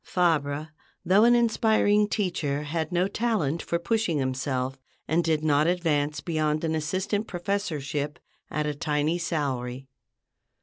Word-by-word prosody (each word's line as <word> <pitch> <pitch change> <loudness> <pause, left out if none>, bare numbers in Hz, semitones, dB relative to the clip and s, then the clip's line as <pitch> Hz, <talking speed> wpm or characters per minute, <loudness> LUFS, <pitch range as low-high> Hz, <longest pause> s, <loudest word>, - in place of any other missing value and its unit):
'" - - -49
Fabre, 155 -4 0 0.4
though 200 +5 +5
an 240 0 +6
inspiring 220 -3 +3
teacher, 160 -9 -1
had 160 +1 -3
no 180 +1 +2
talent 200 -8 0
for 170 - -1
pushing 185 -2 0
himself, 130 0 -2 0.3
and 165 +3 +2
did 155 -1 +1
not 150 0 +3
advance 155 -4 0
beyond 155 -2 0
an 160 -1 0
assistant 185 +7 -1
professorship 155 -6 -2 0.3
at 150 0 -1
a 150 - -1
tiny 150 +3 0
salary. 135 -6 -2
160 Hz, 135 wpm, -26 LUFS, 145-185 Hz, 0.4 s, an